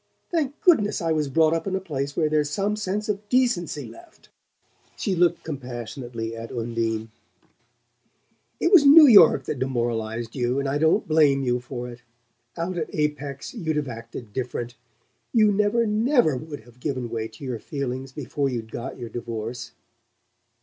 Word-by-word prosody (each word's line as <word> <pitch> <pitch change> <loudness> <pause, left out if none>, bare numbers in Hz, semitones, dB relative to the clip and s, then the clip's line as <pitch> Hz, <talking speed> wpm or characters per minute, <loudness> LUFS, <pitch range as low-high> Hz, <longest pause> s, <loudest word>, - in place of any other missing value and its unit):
Thank 305 -4 -1
goodness 215 - +4
I 165 -2 -1
was 155 -3 0
brought 160 +2 +3
up 165 +3 -2
in 190 - -1
a - - 0
place 140 -6 -4
where 155 - +3
there's 150 -1 +1
some 200 +7 -1
sense 210 0 -3
of 205 0 -3
decency 240 - +1
left!" 345 -1 -16 0.7
She 195 -4 -1
looked 175 0 +2
compassionately 120 -4 -6
at 115 0 -8
Undine. 115 -1 -2 1.5
"It 340 - +1
was 365 -7 +8
New 300 +2 +9
York 185 - +7
that 135 0 -4
demoralized 120 -3 -2
you 125 0 0
and 140 - -1
I 140 +2 0
don't 160 +1 +2
blame 150 -3 +4
you 125 -1 +1
for 125 0 -6
it. 120 0 -10 0.6
Out 175 +1 -2
at 155 - -3
Apex 145 -2 -3
you'd 165 -10 -2
have 150 -2 -1
acted 115 -1 -9
different. 120 -2 -4 0.6
You 215 -3 +5
never 210 +3 +2
NEVER 220 - +2
would 145 +1 -7
have 120 +2 -20
given 130 -3 -3
way 110 -1 -2
to 110 +4 -15
your 125 -4 -4
feelings 135 -1 -4
before 140 0 -2
you'd 115 -3 -5
got 125 +3 -6
your 120 -3 -7
divorce." 115 +1 -6
140 Hz, 165 wpm, -24 LUFS, 120-185 Hz, 1.5 s, New